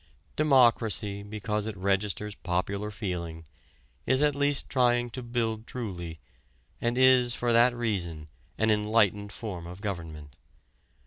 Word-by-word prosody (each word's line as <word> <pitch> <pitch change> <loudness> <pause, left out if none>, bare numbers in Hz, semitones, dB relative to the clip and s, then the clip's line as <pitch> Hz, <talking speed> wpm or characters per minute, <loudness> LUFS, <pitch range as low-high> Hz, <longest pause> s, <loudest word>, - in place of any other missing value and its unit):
Democracy, 115 -8 +3
because 105 +1 -3
it 110 -3 -5
registers 100 +2 -1
popular 100 +4 -2
feeling, 85 -6 -5 0.6
is 130 +2 +3
at 150 -1 +3
least 145 0 +1
trying 120 -2 +2
to 130 - -6
build 115 -2 -2
truly, 85 -9 -6 0.6
and 120 +1 0
is 130 -2 +5
for 120 -1 0
that 120 +1 +5
reason 90 -10 -2 0.3
an 110 0 +2
enlightened 105 -1 +2
form 95 -6 -6
of 90 +2 -9
government. 80 - -6
105 Hz, 125 wpm, -28 LUFS, 95-120 Hz, 0.6 s, is